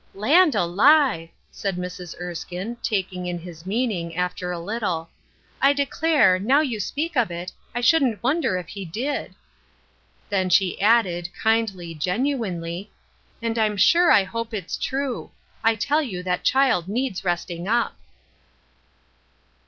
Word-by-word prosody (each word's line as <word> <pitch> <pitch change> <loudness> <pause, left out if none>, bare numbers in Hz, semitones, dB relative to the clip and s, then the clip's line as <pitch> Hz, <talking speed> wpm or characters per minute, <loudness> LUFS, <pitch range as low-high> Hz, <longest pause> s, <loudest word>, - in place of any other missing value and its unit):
" - - -35 0.2
Land 345 -1 +6
alive! 200 - +4
" - - -40
said 195 -2 -3
Mrs. 180 -1 -7
Erskine, 180 +5 -5
taking 185 -3 -2
in 175 0 -2
his 170 0 -11
meaning, 195 -7 -1
after 180 0 -2
a 175 - -3
little, 175 -3 -3 0.2
'' - - -34
I 275 +1 +5
declare, 285 - +3
now 255 +9 +3
you 250 -8 -2
speak 300 - -3
of 245 -6 +2
it, 175 +1 -6 0.2
I 240 - -1
shouldn't 245 -4 +3
wonder 270 - +1
if 180 -2 -7
he 200 -2 -6
did.'' 240 - -4 0.9
Then 190 -2 0
she 185 0 +2
added, 190 -6 +3
kindly, 215 -7 0
genuinely: 185 - -2 0.3
" - - -36
And 230 0 -1
I'm 210 -2 +1
sure 345 - +5
I 200 - +6
hope 230 +3 -5
it's 190 -4 -4
true; 270 -2 -3 0.3
I 225 0 +4
tell 285 +8 +1
you 190 -11 -5
that 180 -1 -1
child 260 -10 +3
needs 235 -1 -2
resting 175 0 -2
up. 235 +2 +1
200 Hz, 150 wpm, -23 LUFS, 180-250 Hz, 0.9 s, Land